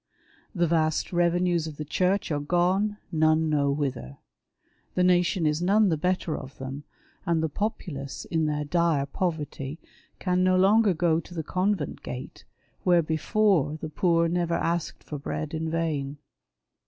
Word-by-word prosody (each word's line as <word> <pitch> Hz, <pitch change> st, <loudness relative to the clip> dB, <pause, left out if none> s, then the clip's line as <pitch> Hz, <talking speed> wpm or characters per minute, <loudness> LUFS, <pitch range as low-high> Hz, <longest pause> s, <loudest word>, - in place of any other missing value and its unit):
The 175 Hz, -1 st, +2 dB
vast 160 Hz, 0 st, +1 dB
revenues 175 Hz, -1 st, +2 dB
of 150 Hz, -2 st, -8 dB
the 150 Hz, -, -5 dB
Church 185 Hz, +5 st, 0 dB
are 145 Hz, -, 0 dB
gone, 180 Hz, +7 st, +1 dB
none 155 Hz, -1 st, +3 dB
know 140 Hz, -2 st, +2 dB
whither. 135 Hz, -, -3 dB, 0.8 s
The 180 Hz, -, +3 dB
nation 180 Hz, -1 st, +3 dB
is 150 Hz, +2 st, +1 dB
none 200 Hz, +3 st, +4 dB
the 165 Hz, -, +2 dB
better 180 Hz, 0 st, -1 dB
of 135 Hz, 0 st, -9 dB
them, 135 Hz, +2 st, -6 dB, 0.4 s
and 165 Hz, -2 st, +1 dB
the 160 Hz, -, 0 dB
populace, 145 Hz, -7 st, -4 dB
in 160 Hz, -2 st, 0 dB
their 150 Hz, 0 st, -1 dB
dire 165 Hz, -3 st, +1 dB
poverty, 150 Hz, -3 st, -3 dB, 0.4 s
can 180 Hz, -1 st, +1 dB
no 185 Hz, 0 st, +4 dB
longer 200 Hz, +1 st, +4 dB
go 165 Hz, -1 st, +2 dB
to 175 Hz, -, -11 dB
the 160 Hz, -, -2 dB
convent 185 Hz, -1 st, -1 dB
gate, 125 Hz, +1 st, -8 dB, 0.4 s
where 175 Hz, -2 st, +4 dB
before 160 Hz, -1 st, +1 dB
the 155 Hz, -, -5 dB
poor 170 Hz, +1 st, +2 dB
never 170 Hz, 0 st, 0 dB
asked 170 Hz, 0 st, -2 dB
for 150 Hz, -, -6 dB
l)read 150 Hz, +2 st, -4 dB
in 160 Hz, 0 st, -2 dB
vain. 150 Hz, -4 st, -2 dB
165 Hz, 155 wpm, -26 LUFS, 150-180 Hz, 0.8 s, none